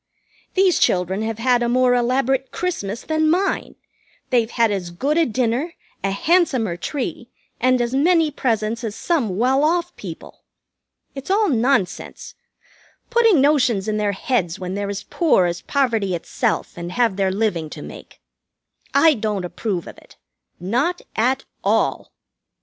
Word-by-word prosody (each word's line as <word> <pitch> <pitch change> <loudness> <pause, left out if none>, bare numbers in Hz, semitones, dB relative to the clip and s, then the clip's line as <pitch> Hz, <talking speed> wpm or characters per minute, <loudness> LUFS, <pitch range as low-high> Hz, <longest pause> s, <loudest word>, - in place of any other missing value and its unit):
These 375 -2 +3
children 185 +2 +1
have 220 0 -3
had 245 +1 +2
a 240 - +1
more 250 0 +3
elaborate 260 +2 +1
Christmas 230 - -3
than 315 0 +1
mine. 375 +4 0 0.6
They've 235 -3 +2
had 230 -2 +2
as 190 -4 -3
good 270 - -1
a 330 -1 +3
dinner, 250 +7 -1 0.3
a 195 - +1
handsomer 255 - +1
tree, 275 - -4 0.3
and 255 +1 +3
as 240 +1 -1
many 320 +2 +3
presents 230 -3 -1
as 220 -2 -4
some 240 - -1
well 260 +5 +2
off 345 +2 +1
people. - - -9 0.7
It's 270 +3 -8
all 415 +2 +3
nonsense, 240 - -1 0.8
putting 455 - +4
notions 255 -8 +2
in 215 0 0
their 205 -1 0
heads 190 -5 -1
when 185 0 -5
they're 200 0 -3
as 200 0 -4
poor 310 - +2
as 175 0 -2
poverty 225 -9 0
itself 170 - -2
and 175 +1 -6
have 235 -5 +2
their 195 -1 +1
living 185 -6 -1
to - - -8
make. - - -12 0.8
I 325 -1 +6
don't 210 -6 -2
approve 180 -1 -3
of - - -11
it. - - -21 0.4
Not 250 - -1
at 260 +4 +1 0.2
all." - - 0
240 Hz, 150 wpm, -21 LUFS, 200-290 Hz, 0.8 s, I